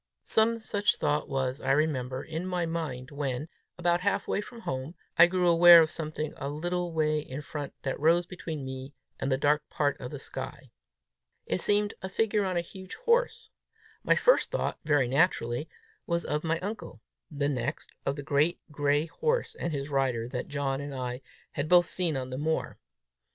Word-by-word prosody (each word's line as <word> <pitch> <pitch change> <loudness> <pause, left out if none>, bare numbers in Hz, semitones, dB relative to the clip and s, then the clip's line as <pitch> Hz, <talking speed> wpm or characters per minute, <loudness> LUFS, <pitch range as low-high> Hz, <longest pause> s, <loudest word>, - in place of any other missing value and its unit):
Some 230 +1 +3
such 205 -1 +1
thought 150 +1 0
was, 135 -1 -1
I - - +2
remember, 130 -3 0
in 160 +3 -4
my 180 -2 0
mind, 150 -6 -4
when, 140 0 -3 0.3
about 175 0 +2
halfway 200 +1 0
from 230 +2 -11
home, 130 -1 -4 0.2
I 170 - +8
grew 180 0 +1
aware 170 0 +9
of 160 0 +3
something 155 -1 -4
a 140 0 -4
little 175 +4 -2
way 155 -1 +1
in 150 0 -6
front 145 -1 -6
that 135 - -2
rose 165 +3 +4
between 160 -5 -6
me 130 +1 -7 0.2
and 135 - -1
a 130 - +3
dark 150 +2 +1
part 145 -2 0
of 125 - -5
the - - -6
sky. - - -7 0.7
It 90 - 0
seemed 205 0 +3
a 190 - -4
figure 210 +1 +1
on 185 -2 -1
a - - +2
huge 185 +2 -10
horse. 470 -2 +1 0.5
My - - +4
first - - +4
thought, - - -2
very 145 -4 +3
naturally, 135 -1 +1 0.4
was 170 0 0
of 150 +1 -1
my 165 0 +1
uncle; 200 - -6 0.3
the 145 -2 -1
next, 135 +1 -3
of 140 - -1
the 145 - -6
great 150 +5 +2
gray 145 +1 +1
horse 460 - -1
and 170 - -3
his 140 -1 -4
rider 130 -4 +1
that 125 -1 -4
John 140 -1 -2
and 140 -1 -6
I 125 0 -4 0.3
had 145 +2 -3
both 175 -1 +7
seen 165 -4 -1
on 130 -1 -4
the 130 - -4
moor. 160 +2 -1
155 Hz, 185 wpm, -29 LUFS, 140-175 Hz, 0.7 s, aware